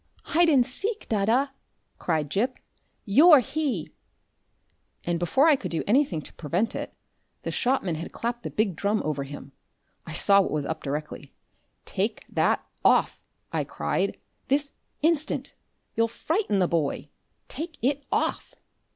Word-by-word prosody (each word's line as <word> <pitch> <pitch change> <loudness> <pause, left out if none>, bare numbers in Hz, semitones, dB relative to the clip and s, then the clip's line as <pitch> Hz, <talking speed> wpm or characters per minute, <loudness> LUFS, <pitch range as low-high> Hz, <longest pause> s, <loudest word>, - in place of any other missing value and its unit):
"Hide 340 +1 +5
and 265 -5 +5
seek, 405 - -3
dadda!" 230 +6 +2 0.5
cried 155 -4 -1
Gip. 245 +8 0 0.5
"You're 295 - +8
He!" 260 - -1 1.1
And 170 -1 -1
before 265 - +3
I 310 - +7
could 195 -9 -5
do 165 - -2
anything 210 - +2
to - - -9
prevent 175 +8 -1
it, - - -5 0.5
the - - -3
shopman 245 -9 0
had 160 +2 -5
clapped 240 +1 -3
the - - -5
big 210 -5 0
drum 205 +5 0
over 150 -2 -1
him. 140 0 -9 0.6
I 160 - -6
saw 200 +4 +5
what - - -1
was 150 -2 -1
up 160 +1 -3
directly. 150 +2 -5 0.5
"Take - - -2
that - - +1 0.2
off," - - +3 0.3
I - - +1
cried, - - -1 0.3
"this 285 +1 +1 0.3
instant! 315 -1 +1 0.4
You'll 230 0 +3
frighten 315 - -1
the 185 -2 +3
boy. 160 -5 -1 0.4
Take 320 +1 -6
it 285 +2 +1
off!" - - -1
220 Hz, 145 wpm, -26 LUFS, 165-280 Hz, 1.1 s, You're